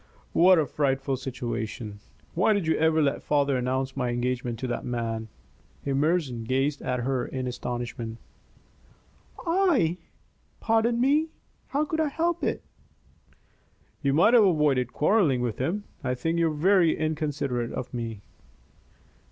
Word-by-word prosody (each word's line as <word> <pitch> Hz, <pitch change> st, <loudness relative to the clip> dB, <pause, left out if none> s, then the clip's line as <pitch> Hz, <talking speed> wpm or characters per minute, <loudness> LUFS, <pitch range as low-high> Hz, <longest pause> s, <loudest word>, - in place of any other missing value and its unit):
"What 180 Hz, +2 st, +6 dB
a 155 Hz, -, +3 dB
frightful 135 Hz, -1 st, 0 dB
situation! 120 Hz, -4 st, -5 dB, 0.3 s
Why 185 Hz, +5 st, +3 dB
did 200 Hz, -4 st, 0 dB
you 160 Hz, -, +2 dB
ever 160 Hz, 0 st, +3 dB
let 140 Hz, -, 0 dB
father 145 Hz, -2 st, +1 dB
announce 130 Hz, +1 st, -1 dB
my 125 Hz, -3 st, -1 dB
engagement 120 Hz, 0 st, -2 dB
to 130 Hz, -, -4 dB
that 120 Hz, -, -3 dB
man?" 115 Hz, -2 st, -3 dB, 0.6 s
Emerson 140 Hz, -3 st, 0 dB
gazed 135 Hz, +5 st, 0 dB
at 125 Hz, -1 st, -2 dB
her 130 Hz, 0 st, 0 dB
in 130 Hz, -1 st, -4 dB
astonishment. 120 Hz, -2 st, -4 dB, 1.3 s
"I? 330 Hz, -, +2 dB, 0.6 s
Pardon 230 Hz, +1 st, +2 dB
me 295 Hz, +5 st, +3 dB, 0.4 s
how 290 Hz, +2 st, 0 dB
could 320 Hz, +1 st, -3 dB
I 315 Hz, -, +2 dB
help 335 Hz, +3 st, -1 dB
it?" -, -, -1 dB, 1.4 s
"You 140 Hz, -1 st, +1 dB
might 175 Hz, -, +5 dB
have 235 Hz, -3 st, +7 dB
avoided 145 Hz, -8 st, +2 dB
quarrelling 155 Hz, -, +2 dB
with 120 Hz, -3 st, -3 dB
him. 175 Hz, +11 st, -1 dB, 0.2 s
I 125 Hz, -1 st, 0 dB
think 165 Hz, +7 st, -1 dB
you 165 Hz, -, +3 dB
are 155 Hz, -, -2 dB
very 175 Hz, +1 st, +3 dB
inconsiderate 145 Hz, -6 st, -2 dB
of 125 Hz, 0 st, -5 dB
me." 115 Hz, -4 st, -4 dB
140 Hz, 140 wpm, -26 LUFS, 125-175 Hz, 1.4 s, have